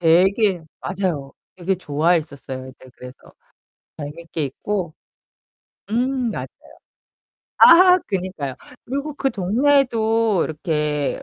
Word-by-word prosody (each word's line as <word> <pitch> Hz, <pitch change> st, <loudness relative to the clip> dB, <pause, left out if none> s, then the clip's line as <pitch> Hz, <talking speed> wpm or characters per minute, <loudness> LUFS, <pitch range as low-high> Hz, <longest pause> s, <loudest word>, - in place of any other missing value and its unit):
되게 180 Hz, +2 st, +3 dB, 0.2 s
맞아요. 175 Hz, -8 st, -3 dB, 0.2 s
되게 185 Hz, +1 st, -1 dB
좋아했었어요. 145 Hz, -5 st, -1 dB
이제 130 Hz, 0 st, -15 dB
그래서 125 Hz, +1 st, -11 dB, 0.8 s
재밌게 155 Hz, +1 st, -5 dB
있고 175 Hz, +4 st, -4 dB, 1.0 s
음 250 Hz, +1 st, 0 dB
맞아요. -, -, -5 dB, 1.1 s
아 360 Hz, +2 st, +8 dB
그니까요. 180 Hz, -8 st, -3 dB, 0.3 s
그리고 280 Hz, +3 st, -4 dB
그 270 Hz, -2 st, 0 dB
동네에도 225 Hz, -, +2 dB
이렇게 150 Hz, -2 st, -2 dB
180 Hz, 230 characters per minute, -21 LUFS, 150-225 Hz, 1.1 s, 아